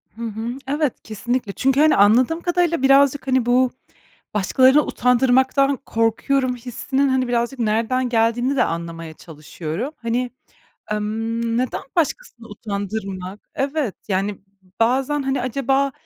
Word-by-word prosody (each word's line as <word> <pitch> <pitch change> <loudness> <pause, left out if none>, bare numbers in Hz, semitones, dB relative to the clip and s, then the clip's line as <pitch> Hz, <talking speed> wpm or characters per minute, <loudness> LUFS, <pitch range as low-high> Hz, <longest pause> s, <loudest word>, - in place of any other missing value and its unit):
Hı 230 - -11
hı. 230 +3 -4
Evet, 290 -1 0
kesinlikle. 240 +1 -3
Çünkü, 270 +1 +1
hani, 310 +1 +5
anladığım 245 +11 +4
kadarıyla 350 -4 +1
birazcık, 275 0 +4
hani, 260 -2 +2
bu 250 +1 +3 0.6
başkalarını 260 +8 +4
utandırmaktan 265 +2 +2
korkuyorum 250 +3 0
hissinin 260 +3 -1
hani 260 -1 +1
birazcık 240 +2 -1
nereden 230 +3 0
geldiğini 240 +3 +1
de 250 - +3
anlamaya 165 -1 -5
çalışıyorum. 160 - -6
Hani, 240 +1 -1 0.6
emm, 225 +2 -2
neden 255 0 -2
başkasını 325 - -2
utandırmak? 200 -2 -5
Evet, 275 -5 -1
yani, 195 +1 -1 0.4
bazen, 265 +5 +1
hani, 270 0 -1
acaba 270 +2 0
245 Hz, 120 wpm, -21 LUFS, 220-270 Hz, 0.6 s, hani